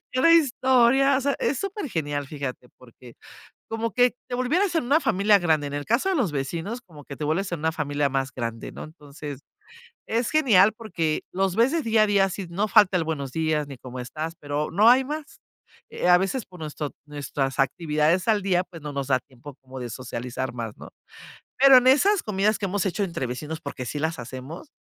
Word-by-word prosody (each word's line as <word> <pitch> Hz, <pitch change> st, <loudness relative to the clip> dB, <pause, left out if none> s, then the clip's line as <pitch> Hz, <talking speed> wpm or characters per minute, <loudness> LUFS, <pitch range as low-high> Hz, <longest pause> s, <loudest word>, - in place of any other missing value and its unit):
cada 270 Hz, +6 st, +4 dB
historia, 265 Hz, -2 st, +4 dB
o -, -, 0 dB
sea, 280 Hz, +1 st, 0 dB
es 275 Hz, -, 0 dB
supergenial, 165 Hz, -, -3 dB
fíjate 135 Hz, -4 st, -6 dB
porque, 125 Hz, -1 st, -16 dB, 0.6 s
como 225 Hz, 0 st, -2 dB
que 245 Hz, +4 st, +3 dB, 0.2 s
te -, -, -5 dB
volvieras 335 Hz, +10 st, +1 dB
en 320 Hz, -6 st, +1 dB
una 285 Hz, +5 st, +4 dB
familia 200 Hz, -2 st, +4 dB
grande, 155 Hz, -4 st, +1 dB
en 140 Hz, -, -7 dB
el 145 Hz, 0 st, -4 dB
caso 235 Hz, -, +1 dB
de 380 Hz, -, +1 dB
los 240 Hz, -, +1 dB
vecinos, 165 Hz, -, -4 dB
como 160 Hz, -, -15 dB
que 140 Hz, -, -9 dB
te -, -, -5 dB
vuelves 180 Hz, +6 st, -1 dB
en 175 Hz, -, -3 dB
una 160 Hz, +1 st, 0 dB
familia 145 Hz, -2 st, -1 dB
más 135 Hz, 0 st, -2 dB
grande, 115 Hz, -2 st, -5 dB
¿no?, -, -, -8 dB
entonces, 145 Hz, -2 st, -9 dB, 0.7 s
es 230 Hz, +2 st, -1 dB
genial 220 Hz, -10 st, +5 dB
porque 165 Hz, -9 st, -2 dB
los 190 Hz, -1 st, 0 dB
ves 235 Hz, +4 st, +3 dB
de 330 Hz, -2 st, 0 dB
día 225 Hz, -2 st, +3 dB
a -, -, +2 dB
día, 200 Hz, -1 st, +3 dB
sí, 190 Hz, 0 st, -6 dB
no 200 Hz, +5 st, -1 dB
falta 205 Hz, -3 st, +5 dB
el 170 Hz, -, 0 dB
buenos 145 Hz, -5 st, -4 dB
días, 155 Hz, -2 st, 0 dB
ni 135 Hz, -2 st, -9 dB
cómo 125 Hz, +1 st, -9 dB
estás, 155 Hz, +6 st, -5 dB
pero 145 Hz, +1 st, -3 dB
no 210 Hz, +7 st, +5 dB
hay 255 Hz, +2 st, +6 dB
más, 300 Hz, +1 st, -7 dB, 0.5 s
eh, 180 Hz, -, -1 dB
a 180 Hz, -, +8 dB
veces 195 Hz, +7 st, -2 dB
por 180 Hz, -1 st, -15 dB
nuestro 150 Hz, -2 st, -5 dB
nuestras 145 Hz, -2 st, -3 dB
actividades 155 Hz, +5 st, +1 dB
al 215 Hz, -2 st, +3 dB
día, 185 Hz, -2 st, +1 dB
pues, 170 Hz, -3 st, -12 dB
no 150 Hz, 0 st, -6 dB
nos 140 Hz, -1 st, -3 dB
da 130 Hz, -2 st, +2 dB
tiempo 130 Hz, +1 st, -14 dB
como 130 Hz, 0 st, -10 dB
de 120 Hz, -1 st, -5 dB
socializar 125 Hz, +1 st, -5 dB
más, 115 Hz, -3 st, -5 dB
¿no?, -, -, -11 dB, 0.7 s
pero 270 Hz, 0 st, +8 dB
en 250 Hz, -, +4 dB
esas 370 Hz, +9 st, +4 dB
comidas 210 Hz, +1 st, 0 dB
que 205 Hz, -, -2 dB
hemos 195 Hz, 0 st, -1 dB
hecho 195 Hz, +2 st, -1 dB
entre 165 Hz, -9 st, -3 dB
vecinos, 150 Hz, +6 st, -6 dB
porque 140 Hz, -4 st, -6 dB
sí 145 Hz, -, -5 dB
las 160 Hz, -2 st, -2 dB
hacemos, 130 Hz, -, -8 dB
170 Hz, 210 wpm, -25 LUFS, 145-230 Hz, 0.7 s, a